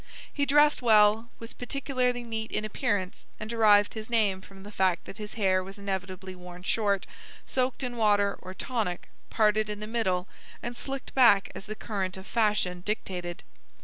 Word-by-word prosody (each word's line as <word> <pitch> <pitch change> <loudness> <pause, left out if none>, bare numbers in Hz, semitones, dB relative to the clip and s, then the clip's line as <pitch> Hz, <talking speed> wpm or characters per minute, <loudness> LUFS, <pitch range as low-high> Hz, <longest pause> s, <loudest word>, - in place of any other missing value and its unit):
He 285 -1 0
dressed 295 +1 +5
well, 220 0 +5
was 230 0 -8
particularly 250 -1 -1
neat 225 -1 -4
in 215 - -1
appearance, 205 -4 -2
and 215 - -5
derived 215 -3 +4
his 220 0 -7
name 210 -5 +2
from 195 0 -14
the 205 - -10
fact 185 -3 +1
that 195 - -10
his 210 0 -6
hair 190 -4 +2
was 195 +2 -10
inevitably 190 -1 -4
worn 180 0 -11
short, 200 -1 +1 0.4
soaked 255 +1 -1
in 245 -1 -3
water 205 -2 +3
or 185 0 -8
tonic, 215 -9 -3 0.2
parted 215 -1 +2
in 210 -1 -4
the 210 - -5
middle, 205 -5 -1 0.4
and 240 0 -4
slicked 270 +1 -6
back 220 -7 +5
as 195 - -8
the 215 - -5
current 195 -4 -3
of 190 - -10
fashion 210 -6 +1
dictated. 180 -4 -4
210 Hz, 175 wpm, -28 LUFS, 190-230 Hz, 0.4 s, dressed